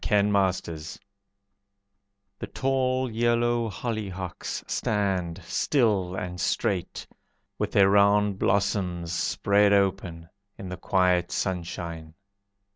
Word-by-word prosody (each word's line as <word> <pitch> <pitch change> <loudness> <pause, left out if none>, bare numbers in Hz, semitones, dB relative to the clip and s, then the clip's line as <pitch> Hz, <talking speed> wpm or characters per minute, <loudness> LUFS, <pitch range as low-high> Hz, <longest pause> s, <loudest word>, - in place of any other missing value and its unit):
Rochester 100 -5 +1 1.6
The - - -5
tall 130 -1 0
yellow 120 0 +1
hollyhocks 95 -6 -5
stand, 95 -4 -1
Still 100 - +1
and 90 -1 -5
straight, 95 -3 -1 0.5
With - - -2
their 100 -1 +6
round 100 0 +3
blossoms 90 -4 0
spread 100 +3 +2
open, 95 -4 0 0.3
In 95 -5 -7
the 90 - -6
quiet 90 -2 +1
sunshine. 85 -3 -4
95 Hz, 90 wpm, -26 LUFS, 90-105 Hz, 1.6 s, their